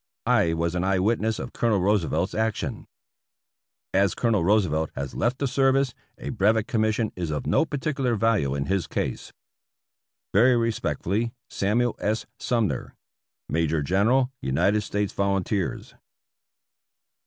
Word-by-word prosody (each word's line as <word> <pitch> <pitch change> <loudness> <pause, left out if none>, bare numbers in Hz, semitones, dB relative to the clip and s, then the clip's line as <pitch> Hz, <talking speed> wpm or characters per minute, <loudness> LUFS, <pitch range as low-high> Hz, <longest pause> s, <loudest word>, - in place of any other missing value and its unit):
I 85 -1 +3
was 85 +1 -1
an 90 0 -1
eye 95 0 +2
witness 110 +3 +1
of - - -6
Colonel 115 -4 +1
Roosevelt's 95 -1 +1
action. 110 -1 -2 1.1
As 95 -2 +3
Colonel 110 -7 +1
Roosevelt 85 -5 +2
has 70 0 -4
left 120 +2 0
the 140 - -1
service, 135 0 +2 0.2
a - - -6
Brevet 110 0 +2
Com 110 - 0
mission 110 0 0
is 85 -3 -3
of 75 -1 -3
no - - +3
particular 140 -5 -1
value 105 -11 +1
in 70 0 -2
his 95 -2 -1
case. - - -3 1.0
Very 120 +5 +5
respectfully, 115 -1 -1 0.2
Samuel 115 +4 +1
S. 110 +2 -1
Sumner, 110 - -1 0.5
Major 80 -1 0
General 115 - +2
United 90 +11 +1
States 105 -1 -2
Volunteers. 100 -1 -1
105 Hz, 130 wpm, -25 LUFS, 90-115 Hz, 1.1 s, Very